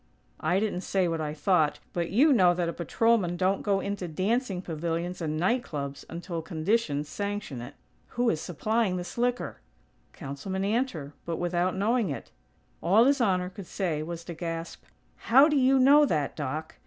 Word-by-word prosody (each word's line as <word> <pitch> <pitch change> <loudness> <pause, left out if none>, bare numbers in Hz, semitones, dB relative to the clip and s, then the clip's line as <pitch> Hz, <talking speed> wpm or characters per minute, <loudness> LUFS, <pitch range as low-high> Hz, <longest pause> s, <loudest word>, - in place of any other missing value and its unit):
I 175 +5 +1
didn't 205 -4 -1
say 190 -1 0
what 165 -1 -2
I 150 0 -3
thought, 155 -1 +2 0.2
but 170 -1 -1
you 280 +9 +5
know 180 -7 +5
that 175 -1 -1
a 170 - -2
patrolman 185 0 +1
don't 190 +2 +1
go 200 -2 +1
into 200 -2 -3
dancing 195 - -1
pavilions 170 +1 -3
and 155 -1 -2
night 230 +10 +2
clubs 140 -2 -6
until 170 0 -5
conditions 160 -2 -1
sanction 200 - -4
it." 120 +4 -9 0.4
"Who 245 0 +2
is 155 - -3
supplying 205 +3 0
this 175 0 -6
liquor?" 245 +1 -1 0.5
"Councilman 165 +7 -5
Antor; 200 - -1
but 170 -1 -3
without 175 +1 0
knowing 220 0 +1
it." 140 - -6 0.5
All 200 +8 +5
His 275 0 +3
Honor 185 -4 +1
could 190 -1 -9
say 170 -6 -2
was 170 +1 -6
to 170 - -7
gasp: 165 0 -6 0.3
"How 270 +5 +6
do 300 - +1
you 270 0 +4
know 285 +3 +6
that, 150 - -1
Doc?" 150 +2 -4
180 Hz, 175 wpm, -28 LUFS, 165-215 Hz, 0.5 s, How